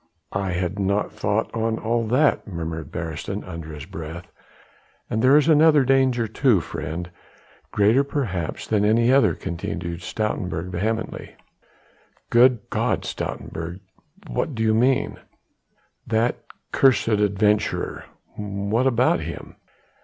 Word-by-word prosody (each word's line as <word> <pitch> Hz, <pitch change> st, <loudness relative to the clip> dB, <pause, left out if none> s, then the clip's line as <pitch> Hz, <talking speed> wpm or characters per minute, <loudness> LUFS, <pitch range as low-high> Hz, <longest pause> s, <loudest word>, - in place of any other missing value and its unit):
"I 95 Hz, -1 st, -1 dB
had 90 Hz, +3 st, -2 dB
not 100 Hz, +1 st, 0 dB
thought 100 Hz, +2 st, -1 dB
on 115 Hz, 0 st, 0 dB
all 115 Hz, 0 st, -1 dB
that," 130 Hz, +4 st, +2 dB
murmured 80 Hz, -5 st, -5 dB
Beresteyn 85 Hz, +5 st, -4 dB
under 80 Hz, -3 st, -8 dB
his 75 Hz, -3 st, -8 dB
breath. 85 Hz, +2 st, -8 dB, 0.8 s
"And 110 Hz, -, 0 dB
there 130 Hz, +4 st, +6 dB
is 150 Hz, -, +3 dB
another 155 Hz, -3 st, +5 dB
danger 130 Hz, -3 st, +2 dB
too, 115 Hz, -1 st, +3 dB
friend, 80 Hz, +3 st, -5 dB, 0.6 s
greater 110 Hz, +7 st, +3 dB
perhaps 110 Hz, -, -3 dB
than 105 Hz, -2 st, +1 dB
any 115 Hz, +4 st, +4 dB
other," 140 Hz, -, +4 dB
continued 85 Hz, -1 st, -5 dB
Stoutenburg 90 Hz, -4 st, -3 dB
vehemently. 110 Hz, +6 st, -3 dB, 1.0 s
"Good 120 Hz, -1 st, +5 dB
G -, -, -1 dB
d, -, -, +2 dB
Stoutenburg, 85 Hz, +3 st, -5 dB, 0.5 s
what 145 Hz, -, -2 dB
do 110 Hz, -, -1 dB
you 110 Hz, -1 st, +3 dB
mean?" 125 Hz, +4 st, +2 dB, 0.9 s
"That 115 Hz, +1 st, 0 dB, 0.3 s
cursed 135 Hz, -2 st, +4 dB
foreign 105 Hz, -2 st, +1 dB
adventurer 105 Hz, +1 st, +1 dB, 0.3 s
" -, -, -32 dB, 0.4 s
"What 120 Hz, +4 st, +3 dB
about 125 Hz, -6 st, +3 dB
him?" 80 Hz, +1 st, -7 dB
105 Hz, 130 wpm, -23 LUFS, 90-120 Hz, 1.0 s, there